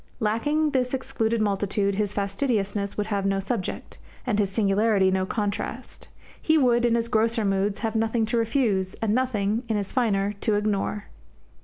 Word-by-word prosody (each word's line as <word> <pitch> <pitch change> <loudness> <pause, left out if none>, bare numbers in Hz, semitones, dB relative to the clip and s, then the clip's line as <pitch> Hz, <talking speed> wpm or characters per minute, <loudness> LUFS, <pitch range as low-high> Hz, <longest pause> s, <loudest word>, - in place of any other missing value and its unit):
Lacking 290 +8 +1
this 255 -1 0
excluded 230 -4 -1
multitude 200 -1 0
his 205 0 -1
fastidiousness 200 -1 -1
would 210 - 0
have 205 -2 -1
no 195 0 +1
subject, 195 0 -4 0.3
and 220 -5 0
his 200 -2 +2
singularity 200 -1 +2
no 190 0 0
contrast. 210 +4 -4 0.3
He 315 0 +3
would, 240 -4 +3
in 235 -1 +3
his 230 0 0
grosser 225 0 +1
moods, 195 +1 0
have 220 0 -2
nothing 225 0 +1
to 235 +2 -1
refuse, 225 -5 0
and 215 -2 -1
nothing, 225 -4 0
in 220 - +1
his 200 -2 -3
finer, 205 -5 +1
to 215 - +1
ignore. 210 0 -1
215 Hz, 165 wpm, -25 LUFS, 200-235 Hz, 0.3 s, He